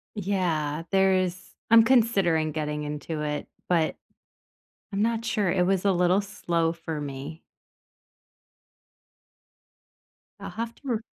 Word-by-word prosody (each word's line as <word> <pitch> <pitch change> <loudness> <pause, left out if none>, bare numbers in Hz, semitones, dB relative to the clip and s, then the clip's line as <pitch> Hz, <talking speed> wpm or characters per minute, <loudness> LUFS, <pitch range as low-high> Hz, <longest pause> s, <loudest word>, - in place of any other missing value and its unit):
Yeah, 170 -7 -1
there 190 -1 +4
is 185 0 -2 0.2
I'm 230 -1 +8
considering 195 -11 +3
getting 150 -1 -3
into 150 +1 -4
it, 150 -1 -3 0.2
but 165 -3 +2 1.0
I'm 200 - -1
not 230 +1 +1
sure. 215 -5 0
It 180 -1 +2
was 190 +1 +1
a 195 - +5
little 180 +2 +3
slow 170 -4 -1
for 160 -2 -5
me. 145 +3 -7 3.0
I'll - - -6
have 230 +1 -5
to - - -24
r 230 -3 0
180 Hz, 125 wpm, -26 LUFS, 155-200 Hz, 3.0 s, I'm